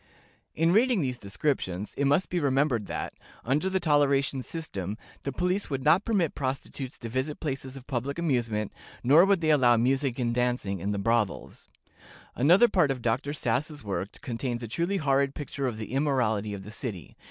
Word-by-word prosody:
In 165 +2 +3
reading 235 -1 +4
these 125 -3 -2
descriptions, 100 -3 -2
it 140 - 0
must 145 +7 +2
be 175 - +1
remembered 135 -6 +1
that, - - -4 0.3
under 150 +10 +1
the 190 0 +1
toleration 140 -4 +2
system, 105 - -5 0.2
the 140 - -3
police 180 +7 -1
would 135 -2 -2
not 165 +7 +4
permit 195 -9 +1
prostitutes 135 -1 -4
to 115 - -7
visit 130 +6 -2
places 135 -3 -4
of 130 - -11
public 135 +2 -3
amusement, 120 -10 -1 0.3
nor 150 +8 +7
would 195 -3 +3
they 155 -1 +3
allow 125 -5 +5
music 130 +2 +1
and 120 -2 0
dancing 120 -6 0
in 100 +4 -3
the 100 - -1
brothels. 115 0 -1 0.6
Another 175 - +5
part 180 -10 +3
of 130 -3 -2
Dr. 130 +5 0
Sass's 145 +2 -2
work 100 0 -4
contains 120 -2 -3
a - - -4
truly 170 - -1
horrid 140 -3 +1
picture 140 -2 -3
of 120 -4 -3
the 110 0 -6
immorality 125 -7 0
of 95 - -8
the 105 - -9
city. 110 - -6
135 Hz, 180 wpm, -28 LUFS, 115-150 Hz, 0.6 s, nor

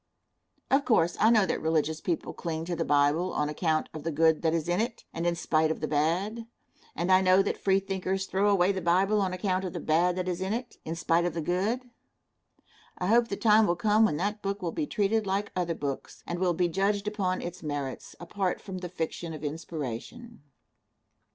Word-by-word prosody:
Of 275 +1 +4
course, 175 -9 +2
I 220 - +5
know 220 -4 +5
that - - -2
religious 160 0 0
people 170 -3 -2
cling 160 -1 -4
to 175 0 -2
the 165 - -1
Bible 145 +5 +2
on 150 0 0
account 155 0 0
of 155 - -6
the 165 - -3
good 160 +1 +3
that 160 - +2
is 165 -1 -1
in 175 +4 +1
it, 230 0 -4
and 165 +1 -2
in 170 - +1
spite 160 -2 +1
of 160 - -2
the 155 - -2
bad, 180 +10 0 0.5
and 175 +3 0
I 185 0 +6
know 185 +1 +5
that 200 - -2
Freethinkers 195 0 0
throw 195 +2 +1
away 195 -1 +4
the 190 -1 -3
Bible 190 +5 +2
on 190 -2 0
account 185 0 -1
of 185 - -4
the - - -4
bad 175 +3 +2
that 185 0 -3
is 180 0 -2
in 190 +2 -1
it, 240 +1 -5
in 160 - -3
spite 165 +1 +1
of 175 -2 -2
the 165 - -1
good. 215 +10 -1 1.1
I 180 - -3
hope 235 +1 +4
the 200 - -4
time 215 -1 +5
will 175 - +2
come 210 +4 +3
when 210 -9 +2
that 205 +4 -2
book 195 0 -3
will 170 - -1
be 300 - -2
treated 215 -2 0
like 200 +2 -1
other 175 -2 -1
books, 140 -3 -5
and 175 0 -4
will 180 -2 +1
be 175 +1 +2
judged 200 +3 0
upon 195 -3 -1
its 175 +1 -6
merits, 145 -3 -5
apart 180 +1 -2
from 190 -2 -7
the 180 -1 -6
fiction 165 -1 -4
of 155 - -10
inspiration. 160 - -6
180 Hz, 215 wpm, -28 LUFS, 165-200 Hz, 1.1 s, I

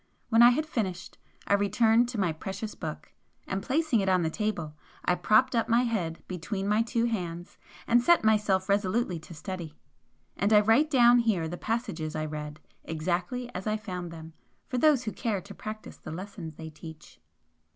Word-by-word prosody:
When 225 0 +5
I 240 - +10
had 300 +6 +1
finished, 190 - -4 0.3
I - - +1
returned 220 +4 +3
to 240 -4 -4
my 185 -4 +2
precious 195 +6 -6
book, 155 -1 -7 0.3
and 190 +1 -3
placing 290 0 +1
it 195 -1 +1
on 185 -2 +3
the 160 - -1
table, 175 -7 -2 0.3
I - - +3
propped 215 +8 +3
up 230 - +1
my 235 +2 +4
head 185 -9 -2
between 190 +2 -4
my 210 +2 +3
two 230 0 0
hands 175 -7 -4 0.3
and 240 +1 +4
set 345 +4 +4
myself 210 -3 +2
resolutely 200 -2 0
to 170 +2 -12
study. 170 -2 -6 0.6
And 200 +3 +1
I 210 - +8
write 225 +9 +4
down 245 -4 +6
here 210 -9 +1
the 170 - -5
passages 175 -8 -3
I 155 0 -2
read, 150 0 -6 0.2
exactly 180 +10 -3
as 185 +3 -5
I 215 0 +1
found 180 -5 -6
them, 160 -1 -10 0.3
for 250 - -2
those 290 -3 +4
who 215 - -3
care 215 -4 -2
to 200 +2 -11
practise 215 +1 -8
the - - -10
lessons 175 -2 -7
they 160 0 -8
teach. 160 0 -12
200 Hz, 185 wpm, -28 LUFS, 175-230 Hz, 0.6 s, I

